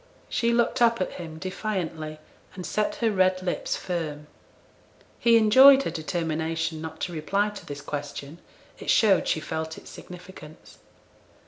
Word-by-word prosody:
She 235 Hz, 0 st, +1 dB
looked 235 Hz, +1 st, +1 dB
up 230 Hz, -1 st, +4 dB
at 185 Hz, -, -1 dB
him 160 Hz, -2 st, -8 dB
defiantly, 175 Hz, -4 st, -4 dB, 0.4 s
and 180 Hz, -2 st, -6 dB
set 210 Hz, -1 st, -1 dB
her 230 Hz, -2 st, +1 dB
red 185 Hz, -1 st, +2 dB
lips 180 Hz, -, -2 dB
firm. 155 Hz, -5 st, -4 dB, 0.9 s
He 235 Hz, -1 st, +5 dB
enjoyed 265 Hz, +5 st, +8 dB
her -, -, -2 dB
determination 160 Hz, -1 st, -2 dB
not 160 Hz, 0 st, -7 dB
to 175 Hz, -, -3 dB
reply 195 Hz, +7 st, 0 dB
to 205 Hz, -, -10 dB
this 145 Hz, 0 st, -6 dB
question; 145 Hz, +2 st, -6 dB, 0.4 s
it -, -, -7 dB
showed 205 Hz, -4 st, +4 dB
she -, -, +1 dB
felt 160 Hz, 0 st, -4 dB
its -, -, -12 dB
significance. 175 Hz, -4 st, -12 dB
175 Hz, 145 wpm, -26 LUFS, 160-210 Hz, 0.9 s, enjoyed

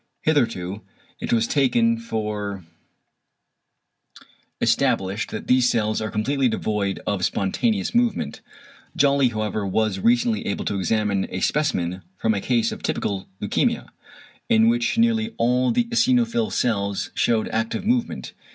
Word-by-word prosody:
Hitherto 115 Hz, -, 0 dB, 0.4 s
it -, -, -4 dB
was 115 Hz, -1 st, +3 dB
taken 230 Hz, -, +2 dB
for 105 Hz, -, -4 dB, 1.9 s
established 95 Hz, +3 st, +1 dB
that 110 Hz, -, -6 dB
these 125 Hz, -1 st, +4 dB
cells 110 Hz, -2 st, 0 dB
are 110 Hz, -, -2 dB
completely 130 Hz, +6 st, 0 dB
devoid 105 Hz, -3 st, -1 dB
of 100 Hz, -3 st, -1 dB
spontaneous 200 Hz, -, 0 dB
movement. 235 Hz, -, 0 dB, 0.5 s
Jolly 140 Hz, -1 st, +4 dB
however 110 Hz, -1 st, -2 dB
was 100 Hz, 0 st, 0 dB
recently 115 Hz, 0 st, +2 dB
able 100 Hz, -, -2 dB
to 100 Hz, -, -1 dB
examine 100 Hz, 0 st, 0 dB
a 90 Hz, -, -4 dB
specimen 95 Hz, -, 0 dB, 0.2 s
from 110 Hz, +3 st, +1 dB
a 100 Hz, -, -2 dB
case 120 Hz, 0 st, +1 dB
of -, -, -7 dB
typical 100 Hz, -2 st, -2 dB
leukæmia, -, -, 0 dB, 0.6 s
=in 110 Hz, +1 st, +5 dB
which 120 Hz, -, 0 dB
nearly 230 Hz, -1 st, +2 dB
all 125 Hz, +2 st, +2 dB
the 240 Hz, 0 st, +2 dB
eosinophil 235 Hz, -1 st, +1 dB
cells 100 Hz, -4 st, -1 dB
shewed 115 Hz, -2 st, +1 dB
active 115 Hz, -, -2 dB
movement=. 235 Hz, +1 st, -1 dB
115 Hz, 130 wpm, -23 LUFS, 100-150 Hz, 1.9 s, =in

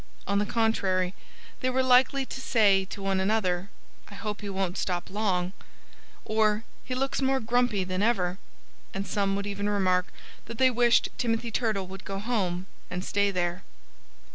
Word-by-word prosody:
On 200 Hz, 0 st, +1 dB
the 205 Hz, -, 0 dB
contrary, 195 Hz, -5 st, +1 dB, 0.5 s
they 255 Hz, -, 0 dB
were 260 Hz, +1 st, +2 dB
quite 260 Hz, -, -1 dB
likely 260 Hz, +2 st, +5 dB
to 265 Hz, -, -7 dB
say 205 Hz, -7 st, +4 dB
to 195 Hz, +1 st, -8 dB
one 195 Hz, -1 st, +1 dB
another, 190 Hz, -2 st, +1 dB, 0.4 s
"I 200 Hz, -, -10 dB
hope 210 Hz, +1 st, -4 dB
he 205 Hz, -, -5 dB
won't 190 Hz, -1 st, -2 dB
stop 180 Hz, 0 st, -2 dB
long," 190 Hz, -3 st, 0 dB, 0.7 s
or 215 Hz, 0 st, +2 dB, 0.2 s
"He 255 Hz, -, -4 dB
looks 270 Hz, +2 st, -1 dB
more 265 Hz, 0 st, +2 dB
grumpy 235 Hz, -3 st, +1 dB
than 185 Hz, +1 st, -2 dB
ever." 190 Hz, -5 st, +1 dB, 0.6 s
And 195 Hz, +1 st, -2 dB
some 195 Hz, -1 st, 0 dB
would 200 Hz, 0 st, -2 dB
even 205 Hz, 0 st, -2 dB
remark 185 Hz, -3 st, +2 dB, 0.4 s
that 230 Hz, -, -7 dB
they 260 Hz, +1 st, +5 dB
wished 240 Hz, -1 st, +4 dB
Timothy 230 Hz, -1 st, 0 dB
Turtle 215 Hz, -4 st, 0 dB
would 190 Hz, +1 st, -9 dB
go 195 Hz, -, -4 dB
home 195 Hz, -5 st, -1 dB, 0.2 s
and 180 Hz, +1 st, -4 dB
stay 200 Hz, 0 st, +2 dB
there. 175 Hz, -2 st, -1 dB
205 Hz, 170 wpm, -28 LUFS, 190-230 Hz, 0.7 s, likely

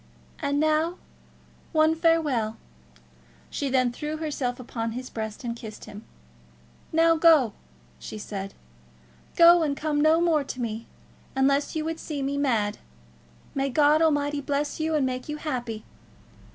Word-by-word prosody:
"And 285 Hz, -2 st, 0 dB
now, 310 Hz, +3 st, +1 dB, 0.8 s
one 315 Hz, 0 st, +4 dB
farewell." 310 Hz, -10 st, +1 dB, 0.9 s
She 280 Hz, -, -2 dB
then 255 Hz, -2 st, +2 dB
threw 300 Hz, +5 st, -4 dB
herself 285 Hz, -6 st, -3 dB
upon 230 Hz, -2 st, -4 dB
his 255 Hz, +1 st, -6 dB
breast 220 Hz, +1 st, -5 dB
and 235 Hz, -1 st, -3 dB
kissed 220 Hz, -2 st, -9 dB
him. 205 Hz, +2 st, -11 dB, 0.9 s
"Now, 330 Hz, +1 st, +4 dB
go," 310 Hz, -, +5 dB, 0.5 s
she 215 Hz, -, -7 dB
said; 195 Hz, -2 st, -6 dB, 0.8 s
"go, 340 Hz, 0 st, +8 dB
and 290 Hz, -3 st, 0 dB
come 300 Hz, -1 st, 0 dB
no 315 Hz, +2 st, +5 dB
more 330 Hz, -4 st, +2 dB
to 260 Hz, -, -7 dB
me, 230 Hz, -1 st, -4 dB, 0.5 s
unless 275 Hz, +3 st, +2 dB
you 310 Hz, -1 st, -1 dB
would 325 Hz, 0 st, -3 dB
see 290 Hz, -3 st, -4 dB
me 275 Hz, +1 st, -1 dB
mad. 230 Hz, -8 st, 0 dB, 0.7 s
May 275 Hz, 0 st, 0 dB
God 300 Hz, +3 st, +4 dB
Almighty 290 Hz, -2 st, +1 dB
bless 285 Hz, +2 st, -2 dB
you, 315 Hz, 0 st, 0 dB
and 290 Hz, -3 st, +2 dB
make 255 Hz, +1 st, -4 dB
you 300 Hz, -, -3 dB
happy!" 245 Hz, -8 st, -4 dB
285 Hz, 145 wpm, -26 LUFS, 245-310 Hz, 0.9 s, go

